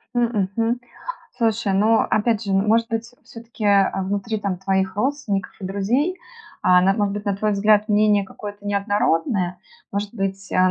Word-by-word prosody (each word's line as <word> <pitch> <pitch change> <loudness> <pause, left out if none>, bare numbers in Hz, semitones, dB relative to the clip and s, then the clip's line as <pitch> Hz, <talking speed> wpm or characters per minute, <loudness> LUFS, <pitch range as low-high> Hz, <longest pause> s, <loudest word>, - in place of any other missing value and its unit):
М, 230 -6 +1
мгм. 230 +2 0 0.6
Слушай, 225 -4 +1
ну, 220 +3 +4
опять 220 0 +1
же, 195 - -1
может 220 +4 +3
быть, 230 +1 -3
всё-таки, 230 -1 -8
а, 200 -1 +4
внутри 205 +3 -2
там 200 -3 -2
твоих 190 0 0
родственников 240 -4 -1
и 190 - -6
друзей, 240 - 0 0.4
а, 180 0 +5
на 195 +1 +4
может 205 -2 0
быть, 205 +1 -5
на 200 -1 0
твой 210 +1 0
взгляд, 210 +1 +3
мнение 210 -1 +4
какое-то 205 +1 -9
неоднородное. 200 -2 0 0.3
Может 205 +1 -3
быть, 195 -2 -3
э, - - 0
205 Hz, 165 wpm, -22 LUFS, 195-225 Hz, 0.6 s, а